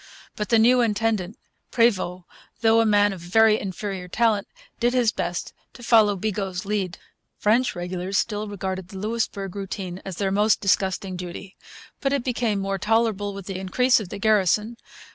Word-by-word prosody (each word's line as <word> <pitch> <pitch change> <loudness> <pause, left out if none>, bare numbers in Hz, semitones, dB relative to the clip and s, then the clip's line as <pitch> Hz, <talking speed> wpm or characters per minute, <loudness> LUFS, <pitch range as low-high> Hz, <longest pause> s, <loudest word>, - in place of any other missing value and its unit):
But 210 - -4
the 230 - +5
new 245 +3 +5
intendant, 220 -3 0 0.3
Prevost, 185 -6 +1 0.4
though 225 0 +5
a 225 - +2
man 205 -1 +4
of 190 - -8
very 215 +5 +4
inferior 190 -1 -5
talent, 215 +1 +1 0.3
did 245 +1 +1
his 240 -3 +3
best 175 -3 -4 0.2
to 245 - -13
follow 220 -3 +5
Bigot's 195 -2 -3
lead. 195 -4 -2 0.4
French 235 +4 +2
regulars 180 +2 -3
still 210 0 -1
regarded 190 -2 -4
the 190 - -10
Louisbourg 205 -2 -3
routine 190 -2 -5
as 190 -2 -6
their 195 +1 -1
most 210 +2 +3
disgusting 190 -1 0
duty. 180 +2 -8 0.4
But 275 0 0
it 280 -3 0
became 235 -4 0
more 195 0 -2
tolerable 215 -2 0
with 200 -2 -8
the 190 -1 -5
increase 240 +7 +3
of 205 -5 -7
the 205 - -6
garrison. 215 +2 +2
205 Hz, 165 wpm, -24 LUFS, 190-225 Hz, 0.4 s, the